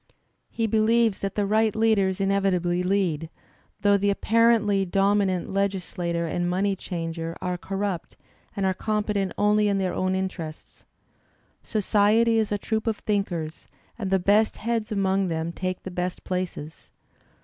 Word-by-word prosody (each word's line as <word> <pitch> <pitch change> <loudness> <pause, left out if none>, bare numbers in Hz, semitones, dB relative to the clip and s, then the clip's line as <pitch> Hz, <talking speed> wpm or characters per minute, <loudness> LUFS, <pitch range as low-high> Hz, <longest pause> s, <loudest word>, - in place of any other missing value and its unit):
He 230 - -1
believes 220 0 +2
that 195 - -3
the 205 - +1
right 215 +1 +2
leaders 210 -4 +2
inevitably 190 -3 +1
lead, 180 -5 0 0.5
though 205 0 +4
the 200 +1 +1
apparently 215 -1 +3
dominant 195 -1 +1
legislator 180 -3 -1
and 175 +2 -1
money 195 +2 +1
changer 165 -2 -5
are 180 0 -2
corrupt 195 -1 -4 0.4
and 195 - -1
are 190 - +2
competent 210 -2 -1
only 210 0 +3
in 200 -1 +1
their 185 -2 -1
own 185 0 0
interests. 180 -5 -6 0.8
^'Society 220 +2 +3
is 220 -2 0
a 205 - +1
troop 220 +2 -2
of 220 -2 0
thinkers, 175 -6 -3 0.3
and 210 -5 -4
the 190 - +3
best 205 +4 +2
heads 230 0 -2
among 195 -1 +1
them 165 0 -2
take 185 +1 -4
the 190 - -6
best 180 0 -3
places." 180 -4 -5
195 Hz, 145 wpm, -25 LUFS, 180-210 Hz, 0.8 s, though